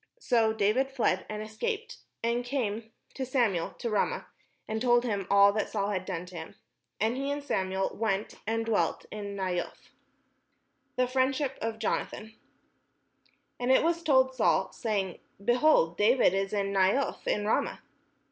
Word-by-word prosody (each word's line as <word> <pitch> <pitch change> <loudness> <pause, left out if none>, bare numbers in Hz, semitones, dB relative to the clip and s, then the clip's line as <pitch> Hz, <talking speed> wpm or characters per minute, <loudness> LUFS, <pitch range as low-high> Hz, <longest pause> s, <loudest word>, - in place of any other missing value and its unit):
So 230 - +2
David 220 +5 +1
fled, 240 -8 0
and 215 0 -4
escaped, 450 - -4 0.2
and 235 +1 +1
came 230 -4 -3 0.2
to 265 - -4
Samuel 235 -10 +1
to - - -4
Ramah, 215 -2 0 0.4
and 220 0 -3
told 240 -1 +4
him 200 -5 -2
all 200 0 +6
that 215 - -1
Saul 200 -2 -1
had 185 -3 -2
done 180 -2 -4
to 180 0 -12
him. 160 -1 -8 0.4
And 220 +4 +1
he 275 +1 -2
and 285 0 -2
Samuel 190 -7 -1
went 210 -2 -1
and 225 0 0
dwelt 225 -2 0
in 205 -1 -5
Naioth. 185 -3 -4 1.0
THE 255 - +2
FRIENDSHIP 265 +2 0
OF 225 0 -2
JONATHAN 220 0 -3 1.3
And 245 +1 +1
it 260 - +5
was 335 0 +1
told 260 -4 +3
Saul, 190 -6 +2
saying, 200 -5 -2 0.3
"Behold, 240 - +3
David 225 -2 +4
is 195 0 -1
at 200 -1 0
Naioth 195 +7 +1
in 210 - 0
Ramah." 215 - 0
220 Hz, 155 wpm, -29 LUFS, 200-255 Hz, 1.3 s, all